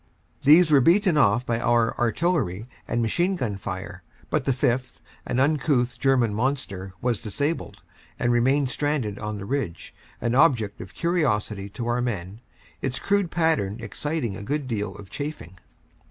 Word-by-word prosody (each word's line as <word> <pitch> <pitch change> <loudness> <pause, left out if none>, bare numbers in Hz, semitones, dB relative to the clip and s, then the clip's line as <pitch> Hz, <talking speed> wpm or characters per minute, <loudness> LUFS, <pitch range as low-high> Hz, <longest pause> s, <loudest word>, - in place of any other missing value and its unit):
These 155 +3 +7
were 140 -2 +6
beaten 180 - +4
off 120 -3 +3
by 115 -2 0
our 120 -1 +2
artillery 120 - 0 0.2
and 120 - 0
machine 175 - +1
gun 120 - -2
fire, 95 0 -6 0.3
but 150 -4 0
the 135 - +2
fifth, 125 0 -1 0.3
an 125 - 0
uncouth 135 -4 +1
German 125 -6 +3
monster, 105 -6 -2
was 120 -4 0
disabled, 145 +9 -3 0.3
and 120 - +1
remained 130 +3 +2
stranded 140 -8 -1
on 105 0 -4
the 100 - -6
ridge, 115 -9 -3 0.3
an 120 - -1
object 125 -8 +3
of 90 - -11
curiosity 105 - 0
to 105 +4 -6
our 120 +1 0
men, 100 -4 -4 0.4
its 125 -2 -2
crude 200 -3 +1
pattern 160 - +1
exciting 115 +1 -3
a - - -7
good 140 +6 -2
deal 105 -5 -3
of 100 -2 -12
chaffing. 140 - -6
120 Hz, 155 wpm, -25 LUFS, 105-145 Hz, 0.4 s, These